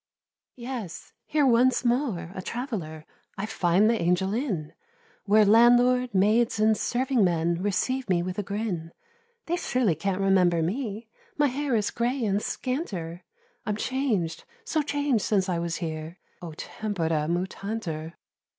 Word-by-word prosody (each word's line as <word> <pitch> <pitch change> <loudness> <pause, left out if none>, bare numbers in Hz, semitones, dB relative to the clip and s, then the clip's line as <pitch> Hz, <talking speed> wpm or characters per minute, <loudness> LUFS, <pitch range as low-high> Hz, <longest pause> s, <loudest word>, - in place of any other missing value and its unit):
Yes! 235 -8 -7
here, 295 -1 +2
once 250 0 +3
more, 240 - 0
a 185 - -5
traveller, 180 - -5 0.3
I 195 - -2
find 190 -1 +2
the 230 0 +2
Angel 180 +3 +1
Inn, 210 - -2 0.5
Where 210 +1 +5
landlord, 245 +3 +5
maids, 215 +4 +3
and 215 0 +4
serving 250 0 +1
men, 170 -1 +1
Receive 210 +6 -1
me 175 -2 +2
with 185 +2 -4
a - - +2
grin: 200 -5 -4 0.5
They 345 +2 -1
surely 245 - +1
can't 185 +5 -2
remember 180 -4 +3
me, 220 +3 -3 0.3
My 295 -1 +3
hair 275 0 -1
is 210 -2 0
grey 240 +1 -1
and 200 0 +1
scanter; 190 - -4 0.4
I'm 210 -3 -2
chang'd, 215 -10 -1 0.2
so 315 -8 +1
chang'd 285 -5 0
since 195 -1 +1
I 175 -2 0
was 170 -1 -2
here— 160 0 -5 0.2
"O 170 -3 -7
tempora 165 -4 -2
mutantur!" 175 -2 -3
205 Hz, 140 wpm, -26 LUFS, 175-245 Hz, 0.5 s, Where